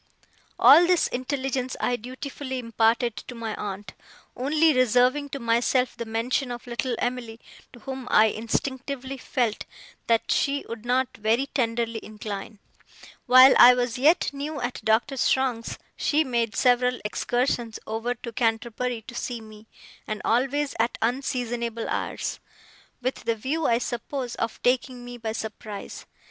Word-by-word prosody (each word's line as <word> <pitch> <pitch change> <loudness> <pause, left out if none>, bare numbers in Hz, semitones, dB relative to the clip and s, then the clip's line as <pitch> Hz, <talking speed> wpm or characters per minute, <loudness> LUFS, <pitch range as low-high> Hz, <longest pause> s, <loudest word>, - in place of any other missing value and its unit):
All 345 +1 +8
this 360 -2 +3
intelligence 260 0 -2
I 245 - +1
dutifully 260 +3 -6
imparted 230 0 +1
to 245 - -8
my 225 -2 -4
aunt, 205 0 -6 0.4
only 305 +5 +3
reserving 255 +3 +3
to 275 - -5
myself 240 +2 +1
the 235 0 -5
mention 240 +4 -1
of 240 +1 -7
little 245 +1 -2
Em'ly, 240 -2 -3 0.3
to 240 - -15
whom 265 +1 -6
I 215 - +6
instinctively 260 +4 -3
felt 245 -4 -1 0.4
that 230 -1 +2
she 280 0 +1
would 230 0 -7
not 255 +1 +1
very 225 +5 +1
tenderly 230 -4 -1
incline. 210 0 -7 0.7
While 255 +1 +9
I 250 +1 +10
was 245 0 -1
yet 305 +5 +4
new 290 +2 -4
at 245 0 -4
Doctor 225 +5 +1
Strong's, 250 -3 0 0.2
she 305 +1 +2
made 235 -5 -1
several 250 0 +3
excursions 240 +1 -1
over 225 +3 -2
to 235 0 -8
Canterbury 230 +1 -1
to 240 - -10
see 240 0 -4
me, 215 0 -14 0.4
and 215 -1 -3
always 275 +5 +1
at 230 +1 +1
unseasonable 240 -2 -2
hours: - - -3 0.6
with 255 -1 -3
the 230 0 +1
view, 285 +8 -1
I 230 - +3
suppose, 245 +1 -4
of 230 -1 -3
taking 250 0 0
me 245 0 -8
by 220 -1 -3
surprise. 215 -2 -7
245 Hz, 145 wpm, -25 LUFS, 230-260 Hz, 0.7 s, I